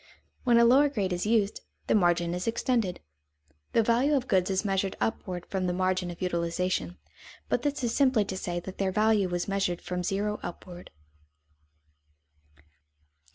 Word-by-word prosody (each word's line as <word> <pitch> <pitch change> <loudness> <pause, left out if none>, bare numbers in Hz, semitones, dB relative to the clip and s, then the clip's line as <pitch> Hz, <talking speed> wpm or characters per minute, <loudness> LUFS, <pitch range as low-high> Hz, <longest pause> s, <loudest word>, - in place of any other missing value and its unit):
When 240 -2 +5
a 235 - +6
lower 275 +5 +5
grade 200 -9 -1
is 175 +3 -2
used, 215 -2 +1 0.2
the - - +1
margin 175 -3 +2
is 180 +3 -4
extended. 230 -4 0 0.7
The 230 - +4
value 245 +6 +2
of 265 -2 -1
goods 185 -3 +2
is 190 +2 0
measured 195 -1 0
upward 180 -5 -3
from 190 -2 -2
the 180 - 0
margin 185 0 0
of 175 +1 -7
utilization, 170 - -1 0.5
but 245 - +1
this 290 0 -2
is 235 -1 0
simply 255 -7 +3
to 190 - -5
say 175 -2 -3
that 185 +1 -9
their 195 -1 +1
value 210 -2 +2
is 175 - -2
measured 195 -3 -1
from 180 0 -4
zero 205 +3 -1
upward. 175 0 -9
195 Hz, 160 wpm, -28 LUFS, 180-225 Hz, 0.7 s, a